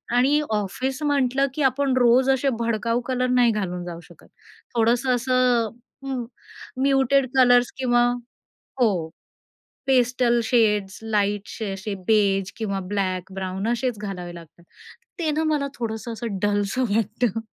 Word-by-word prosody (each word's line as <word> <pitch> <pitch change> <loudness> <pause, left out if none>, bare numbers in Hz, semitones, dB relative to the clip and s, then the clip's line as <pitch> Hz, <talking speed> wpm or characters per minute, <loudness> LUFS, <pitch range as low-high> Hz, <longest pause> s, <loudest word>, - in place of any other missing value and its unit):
आणि 275 +5 +4
ऑफिस 255 +7 -2
म्हंटलं, 275 -2 +2
की 305 - -3
आपण 265 0 +2
रोज 250 +2 +4
असे 270 +1 +2
भडकाऊ 230 +1 0
कलर 255 -1 0
नाही 245 -2 +4
घालून 180 -4 -3
जाऊ 170 -1 -7
शकत. - - -18 0.5
थोडंसं 240 +3 +2
असं 250 -2 +2 0.4
हं, 260 -3 -3 0.6
म्युटेड 275 0 +3
कलर्स 245 -1 +5
किंवा 240 -2 +2 0.8
हो 235 - +5 1.0
पेस्टल 245 -2 +3
शेड्स, 210 -5 +1
लाईटशे 205 -1 -1
असे 200 +2 -5
बेज 200 -3 +2
किंवा 200 -3 -2
ब्लॅक, 190 -2 -2
ब्राउन 190 +2 -3
असेच 240 0 -1
घालावे 180 -4 -6
लागतात. 170 0 -14 0.6
ते 315 -3 0
ना 315 +2 0
मला 300 -3 0
थोडंसं 230 0 -4
असं 225 -3 -4
डलसं 205 +4 0
वाटतं 225 +1 0
235 Hz, 130 wpm, -23 LUFS, 205-255 Hz, 1.0 s, कलर्स